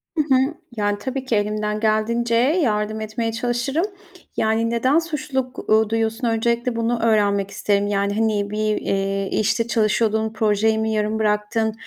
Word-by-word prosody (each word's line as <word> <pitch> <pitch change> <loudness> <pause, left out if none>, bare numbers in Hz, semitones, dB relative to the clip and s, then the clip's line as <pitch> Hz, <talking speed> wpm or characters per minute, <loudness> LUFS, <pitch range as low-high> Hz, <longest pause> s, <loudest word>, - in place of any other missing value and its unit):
Hı 310 - +3
hı, 265 +4 +2 0.2
yani, 205 -1 0
tabii 265 +3 -4
ki 245 - 0
elimden 210 0 -1
geldiğince 230 +2 +1
yardım 225 - +1
etmeye 220 +1 -2
çalışırım. 245 - -1 0.5
Yani, 220 +1 +1
neden 255 +7 +2
suçluluk, 265 -5 -4
ııı, 220 0 +4
duyuyorsun? 225 +2 -1
Öncelikle 235 +2 0
bunu 230 +1 0
öğrenmek 200 -3 +2
isterim. 200 0 0
Yani, 200 0 0
hani 215 -2 0
bir, 215 0 0
eee, 195 0 -1
işte 220 +2 +1
çalışıyordun, 220 0 +1
projeyi 220 0 +2
mi 220 0 0
yarım 215 0 -1
bıraktın, 215 +1 0
220 Hz, 145 wpm, -21 LUFS, 210-235 Hz, 0.5 s, ııı